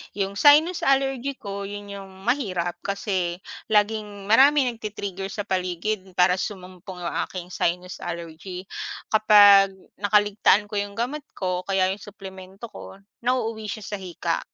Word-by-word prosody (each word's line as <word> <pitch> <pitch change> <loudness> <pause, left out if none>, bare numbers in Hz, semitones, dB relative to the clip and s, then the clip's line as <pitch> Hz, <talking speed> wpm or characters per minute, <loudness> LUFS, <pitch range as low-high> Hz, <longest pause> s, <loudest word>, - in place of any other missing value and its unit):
'Yong 200 0 -2
sinus 310 +5 +5
allergy 270 0 +1
ko 200 -4 -6
'yon 205 0 -8
'yong 195 -1 -9
mahirap 185 -9 -1
kasi 190 -3 -2 0.3
laging 210 -1 0
maraming 265 +2 +5
nagti-trigger 200 -3 -5
sa 205 +1 -5
paligid 185 +1 -3
para 180 +1 +4
sumumpong 185 -2 -7
'yong 170 - -3
aking 180 -2 -7
sinus 180 +1 -2
allergy. 175 +2 -7 0.5
Kapag 205 -2 +7 0.3
nakaligtaan 205 0 +3
ko - - -14
'yong 200 0 -4
gamot 265 +6 -3
ko 180 -1 -2
kaya 190 -1 +2
'yong 200 - -5
suplemento 195 +1 -10
ko - - -10 0.2
nauuwi 230 -3 -1
siya 215 0 -5
sa 205 - -5
hika. 175 -2 -2
200 Hz, 135 wpm, -24 LUFS, 185-215 Hz, 0.5 s, Kapag